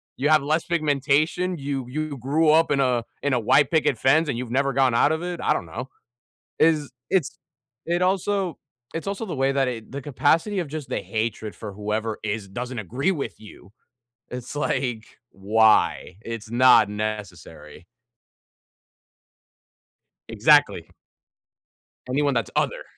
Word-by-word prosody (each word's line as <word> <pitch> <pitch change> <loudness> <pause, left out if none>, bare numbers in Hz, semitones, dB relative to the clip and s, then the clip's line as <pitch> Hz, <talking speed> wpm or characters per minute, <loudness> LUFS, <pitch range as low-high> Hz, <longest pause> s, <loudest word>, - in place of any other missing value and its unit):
you 145 +4 0
have 155 -2 +5
less 155 +3 0
pigmentation, 155 +3 +1
you 135 -2 -4
you 155 0 -4
grew 150 +6 +2
up 160 +2 +4
in 140 - +2
a 125 -3 +1 0.2
in 145 - +1
a 125 - +2
white 135 +7 +3
picket 155 -5 +2
fence, 150 +7 +3
and 120 - -2
you've 120 -1 -5
never 140 +1 +1
gone 130 -2 +2
out 145 - +3
of 160 +2 -2
it, 175 -1 -4
I - - +2
don't - - -3
know. 130 +1 -7 0.7
Is 155 -5 +2 0.2
it's 180 -7 0 0.5
it 175 +1 0
also 190 -2 0 0.3
it's 165 +3 -5
also 200 +3 -3
the 175 -7 -5
way 135 +1 +1
that 135 -2 +1
it 115 -1 -7
the 140 -1 -5
capacity 165 - +1
of 175 - -1
just 150 -2 -6
the - - -2
hatred 110 -1 -3
for 105 -2 -8
whoever 105 +2 -3
is 105 -1 -3
doesn't 125 +3 -5
agree 130 - -1
with 145 -6 -4
you, 105 -2 -15 0.6
it's, 125 +2 -7
like, 120 -6 -1 0.3
"Why? 105 -2 +2
It's 115 -2 -7
not 120 -3 +6
necessary." 95 -7 -6 2.4
Exactly. - - +3 1.2
Anyone 140 +2 +1
that's 115 -5 -1
other - - 0
135 Hz, 150 wpm, -24 LUFS, 115-155 Hz, 2.4 s, not